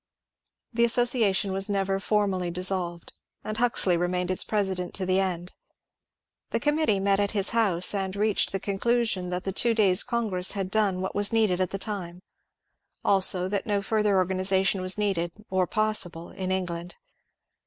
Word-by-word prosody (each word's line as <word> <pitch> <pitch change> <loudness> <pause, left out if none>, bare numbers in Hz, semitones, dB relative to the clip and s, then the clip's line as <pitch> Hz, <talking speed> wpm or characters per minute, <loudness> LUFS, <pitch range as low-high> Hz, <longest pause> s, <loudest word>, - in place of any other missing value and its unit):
The 235 0 +2
association 230 -5 +2
was 195 +1 +1
never 195 -1 -1
formally 195 -3 0
dissolved, 175 -1 -2 0.3
and 215 - -5
Huxley 225 -6 +2
remained 180 +1 -1
its 185 - 0
president 190 -4 -2
to 190 - -2
the 185 +1 +2
end. 180 -2 -3 1.0
The - - -1
committee 295 -8 +1
met 195 0 +1
at 205 0 +1
his 195 - +1
house 200 -7 +2
and 190 -1 -3
reached 210 +1 +1
the 195 - -2
conclusion 200 -1 -1
that 180 0 -3
the 195 - -3
two 230 +4 +1
days' 195 -4 +4
congress 210 -6 0
had 195 -2 -4
done 200 -4 +1
what 190 - -4
was 205 0 +2
needed 215 -5 +1
at 185 - 0
the 195 - -4
time; 185 -4 -5 0.8
also 190 -2 +3
that 200 -1 -3
no 205 -1 0
further 210 -1 +1
organization 190 +1 +1
was 185 +1 +1
needed 180 -5 -1 0.2
or 185 -1 +1
possible 205 -6 0
in 185 -1 -5
England. 175 -2 -4
195 Hz, 165 wpm, -26 LUFS, 185-210 Hz, 1.0 s, days